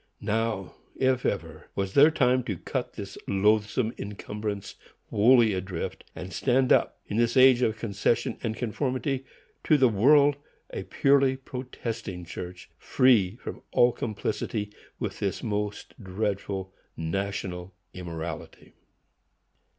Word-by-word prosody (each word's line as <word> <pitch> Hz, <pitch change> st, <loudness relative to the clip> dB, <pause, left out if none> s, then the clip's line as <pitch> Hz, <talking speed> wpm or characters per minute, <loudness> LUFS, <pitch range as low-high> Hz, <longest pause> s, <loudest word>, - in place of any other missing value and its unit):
Now, 110 Hz, -3 st, -1 dB, 0.2 s
if 130 Hz, -1 st, +1 dB
ever, 80 Hz, -5 st, -4 dB
was 95 Hz, -1 st, -2 dB
their 145 Hz, +3 st, +8 dB
time 130 Hz, -4 st, +2 dB
to 100 Hz, -7 st, -3 dB
cut -, -, -4 dB
this -, -, -8 dB
loathsome 105 Hz, +3 st, +2 dB
incumbrance 105 Hz, 0 st, -5 dB, 0.4 s
wholly 115 Hz, 0 st, +5 dB
adrift, 95 Hz, -2 st, -4 dB
and 90 Hz, 0 st, -7 dB
stand 130 Hz, 0 st, +3 dB
up, -, -, +2 dB
in 105 Hz, -, -4 dB
this 120 Hz, +1 st, +2 dB
age 130 Hz, -1 st, +7 dB
of 110 Hz, -3 st, +1 dB
concession 115 Hz, +3 st, -1 dB
and 110 Hz, -2 st, -2 dB
conformity 130 Hz, +3 st, -2 dB, 0.4 s
to 155 Hz, -, +4 dB
the 130 Hz, -3 st, +5 dB
world, 140 Hz, +7 st, +5 dB, 0.3 s
a -, -, -5 dB
purely 135 Hz, -1 st, +3 dB
protesting 115 Hz, -8 st, -6 dB
church, 90 Hz, 0 st, -8 dB
free 115 Hz, -8 st, +3 dB
from -, -, -8 dB
all 120 Hz, 0 st, +5 dB
complicity 105 Hz, -1 st, -3 dB, 0.2 s
with -, -, -4 dB
this -, -, -2 dB
most 105 Hz, -1 st, -3 dB
dreadful 95 Hz, -1 st, -3 dB, 0.2 s
national 90 Hz, +1 st, -3 dB, 0.2 s
immorality. 85 Hz, -3 st, -7 dB
110 Hz, 120 wpm, -27 LUFS, 95-125 Hz, 0.4 s, their